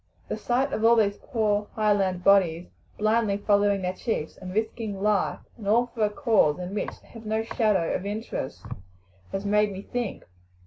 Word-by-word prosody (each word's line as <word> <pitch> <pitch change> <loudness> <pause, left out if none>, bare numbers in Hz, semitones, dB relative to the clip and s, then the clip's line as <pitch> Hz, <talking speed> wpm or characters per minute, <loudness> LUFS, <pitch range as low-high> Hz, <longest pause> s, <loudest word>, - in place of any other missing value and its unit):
The - - -1
sight 260 +3 0
of 220 - -2
all 230 +1 +6
these 205 -3 +2
poor 210 -5 0
Highland 200 -4 +1
bodies 180 -4 +4 0.3
blindly 215 -1 +2
following 205 -1 +2
their 180 0 -1
chiefs 185 -6 -3
and 185 -1 -8
risking 220 0 -2
life 210 0 +1 0.2
and 210 -4 -8
all 235 +3 +3
for 225 - -1
a 210 - +3
cause 210 - +2
in 180 +1 -6
which 210 - -4
they - - -21
have 225 -1 -12
no 220 +1 0
shadow 210 -7 +1
of 185 - -2
interest 205 - -5 0.7
has 195 +1 -3
made 210 0 +3
me 195 0 -7
think. 240 -3 -4
210 Hz, 180 wpm, -26 LUFS, 195-220 Hz, 0.7 s, all